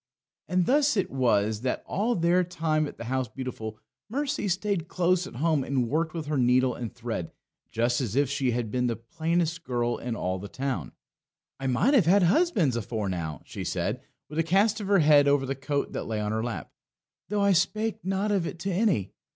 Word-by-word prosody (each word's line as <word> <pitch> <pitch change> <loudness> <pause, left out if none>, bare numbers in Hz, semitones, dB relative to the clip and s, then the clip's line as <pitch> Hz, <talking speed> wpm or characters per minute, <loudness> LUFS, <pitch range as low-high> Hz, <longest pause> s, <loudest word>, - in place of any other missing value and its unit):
And 180 +1 +2
thus 285 - +3
it 195 - 0
was 110 -5 +1
that 125 0 -2
all 225 +6 0
their 175 +1 +3
time 160 -3 0
at - - -10
the - - -6
House 130 +1 -1
Beautiful 110 -2 -6 0.3
Mercy 280 -2 -1
stayed 190 -2 -1
close 180 0 +1
at - - -11
home 155 +1 +1
and 130 -2 0
worked 160 +2 0
with 160 -2 -3
her 145 -1 -1
needle 125 +1 +3
and 120 -3 -5
thread 115 -8 -5 0.4
just 120 +2 +1
as 115 -3 -3
if 140 0 +3
she 135 -1 0
had 120 -2 -1
been 125 -1 +1
the 115 - 0
plainest 165 +7 -1
girl 120 -2 -1
in 120 -1 -3
all 95 -3 -2
the 100 - -7
town. 135 +4 -3 0.7
"I 135 - -2
might 165 - +2
have 220 - +5
had 195 +2 +5
husbands 190 - +3
afore 110 -2 -2
now," 80 -5 -4
she - - -6
said, - - -2 0.3
with 150 +2 -4
a - - +4
cast 200 +6 +2
of 200 - -4
her 200 0 +4
head 150 -3 +6
over 140 -1 +3
the 135 - -1
coat 140 +1 -2
that - - -4
lay 110 -1 -2
on 105 0 -1
her 110 +1 -1
lap, 120 -1 -5 0.6
"though 210 0 0
I 200 0 +4
spake 215 +5 0
not 195 +3 0
of 190 -5 +1
it - - -6
to 195 - -1
any. 180 - +1
145 Hz, 210 wpm, -27 LUFS, 120-185 Hz, 0.7 s, head